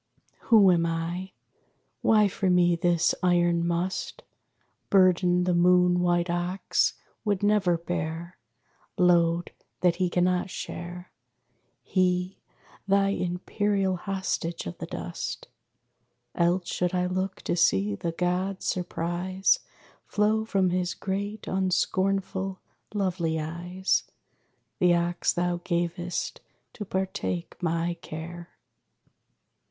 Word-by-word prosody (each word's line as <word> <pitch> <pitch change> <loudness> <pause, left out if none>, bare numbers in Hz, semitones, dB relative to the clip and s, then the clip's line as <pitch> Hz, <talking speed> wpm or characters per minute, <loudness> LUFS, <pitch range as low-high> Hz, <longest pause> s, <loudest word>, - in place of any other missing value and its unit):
Who 205 -5 +7
am 170 -1 +3
I? 170 +3 -3 0.7
Why 215 -2 +5
for 195 0 -1
me 175 -1 +4
this 175 0 +2
iron 175 -1 +2
Must? 180 - -2 0.7
Burden 180 -2 +4
the 180 0 +1
moon 180 0 +4
white 175 0 +2
ox 175 +2 0 0.3
would 205 -2 0
never 205 -4 +3
bear; 170 +1 -4 0.6
Load 175 -1 +3 0.3
that 175 -2 +3
he 180 -1 +1
cannot 180 +1 +1
share, 175 0 -7 0.7
He, 180 0 0 0.5
thine 195 0 +3
imperial 190 +2 0
hostage 185 -2 -3
of 85 - -5
the - - -5
dust. - - -5 0.9
Else 175 +1 +1
should 180 0 -1
I 180 0 +1
look 185 +1 -3
to - - 0
see 105 - +3
the 165 +12 -3
god's 180 +3 -1
surprise 180 +2 0 0.5
Flow 215 +1 +1
from 190 -4 +1
his 180 0 -1
great 200 +2 -4
unscornful, 190 0 0 0.4
lovely 175 -5 0
eyes 175 +4 -1 0.7
The 175 -1 +5
ox 170 0 +1
thou 175 0 0
gavest 175 0 -2 0.3
to 210 - -6
partake 190 -2 -3
my 170 0 0
care. 170 +2 -8
180 Hz, 105 wpm, -27 LUFS, 175-190 Hz, 0.9 s, Who